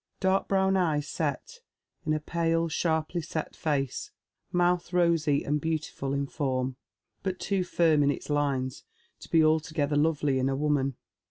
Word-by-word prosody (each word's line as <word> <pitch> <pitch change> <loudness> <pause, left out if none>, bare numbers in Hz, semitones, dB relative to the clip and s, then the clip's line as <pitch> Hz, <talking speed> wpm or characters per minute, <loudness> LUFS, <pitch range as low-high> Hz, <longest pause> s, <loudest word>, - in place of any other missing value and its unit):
Dark 190 0 +2
brown 190 0 +2
eyes 155 -5 +1
set 485 - -3 0.5
in 155 - +3
a - - -1
pale, 165 +1 0
shai 160 0 +1
ply 175 - -3
set 155 0 -4
face; 140 -5 -1 0.4
mouth 175 0 +1
rosy 165 -5 +3
and 150 +1 0
beautiful 155 -3 -2
in 140 0 0
fonn, 130 -3 -2 0.5
but 185 -1 -3
too 200 -1 0
fiiTn 165 -4 +3
in 140 - +3
its 145 - -3
lines 140 -3 -1 0.4
to - - -12
be 160 -1 +5
altogether 155 -1 +1
lovely 145 -3 +2
in 130 +1 +1
a 135 - 0
woman. 140 -2 +1
155 Hz, 160 wpm, -28 LUFS, 140-170 Hz, 0.5 s, be